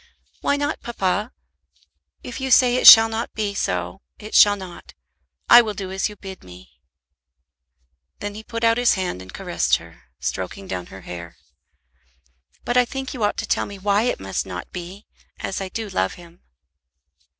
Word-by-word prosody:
"Why 285 - +1
not, 290 +2 -2
papa? 210 0 -2 0.9
If 250 +2 -7
you 265 - -2
say 250 -1 +5
it - - +4
shall 225 0 +11
not 225 +1 -5
be 210 -2 -2
so, 90 - -3 0.2
it 215 0 -11
shall 205 -1 +7
not. 185 -3 -11 0.5
I 240 - +9
will 215 -3 -4
do 190 -1 -6
as 190 +2 -1
you 210 - -11
bid 190 -2 -10
me." 90 0 -16 1.4
Then 205 0 -5
he 215 - -8
put 230 +1 -6
out 230 +1 +3
his 245 - +3
hand 185 - -3
and 95 0 -11
caressed - - 0
her, - - -11
stroking 95 - -4
down 90 - -5
her 95 - -12
hair. 85 -1 -9 1.3
"But 240 - 0
I 250 - +6
think 265 +2 -6
you 245 -5 -4
ought 205 - 0
to - - -4
tell - - 0
me 200 - -9
why 200 +1 +1
it - - -3
must 95 0 -3
not 90 -2 -8
be, 180 +3 -9 0.3
as 195 - -4
I 190 - -5
do 220 +3 -5
love 95 - -1
him." 175 0 -16
200 Hz, 180 wpm, -22 LUFS, 175-230 Hz, 1.4 s, shall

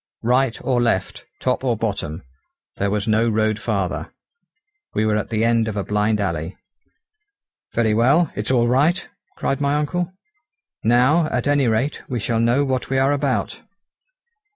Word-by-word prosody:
Right 125 +1 +2
or 125 -2 +1
left, 115 -6 -1
top 130 0 -1
or 120 -4 +1
bottom, 95 -7 -3 0.5
there 100 - 0
was 105 +1 -1
no 110 +2 +3
road 110 -1 +1
farther; 100 -5 -2 0.8
we 110 - +1
were 110 -1 +2
at 105 - -2
the 110 0 +1
end 115 -1 +2
of 105 -2 -3
a 100 - -1
blind 105 +1 0
alley. 85 -2 -3 1.2
"Very 110 -2 +2
well, 140 +9 +3
it's 105 - -3
all 120 -2 +3
right!" 145 +8 +2 0.3
cried 135 +1 -1
my 140 0 +1
uncle, 170 +4 -1 0.7
"now, 125 +8 +4
at - - -2
any 145 -3 +3
rate, 115 +6 0
we 125 -3 -2
shall 115 +2 -1
know 120 +5 +2
what 130 -2 -2
we 135 - 0
are 135 +1 +3
about. 145 - -1
115 Hz, 160 wpm, -21 LUFS, 110-135 Hz, 1.2 s, now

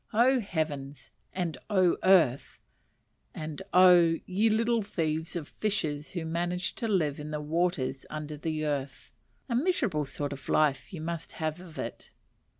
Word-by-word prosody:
Oh, 250 +4 +4
heavens! 145 - -4 0.2
and 170 -7 -3
oh, 185 -4 +4
earth! 165 -9 +4 0.8
and 155 +1 -5
oh, 175 -2 +7
ye 205 +5 +2
little 230 +1 +2
thieves 160 -4 -2
of 160 -4 -4
fishes 155 -9 -2
who 170 -3 -3
manage 175 +2 -1
to 230 - -2
live 160 -9 +1
in 150 0 -6
the 150 0 -3
waters 150 -4 -1
under 155 0 -5
the 155 0 -3
earth 140 -2 -3 0.4
(a 245 - -2
miserable 240 - +1
sort 145 +1 -4
of 135 -1 -10
life 140 -5 +2
you 170 - -6
must 165 0 -5
have 155 +2 -3
of 175 -4 -12
it)! - - -6
160 Hz, 150 wpm, -29 LUFS, 150-185 Hz, 0.8 s, oh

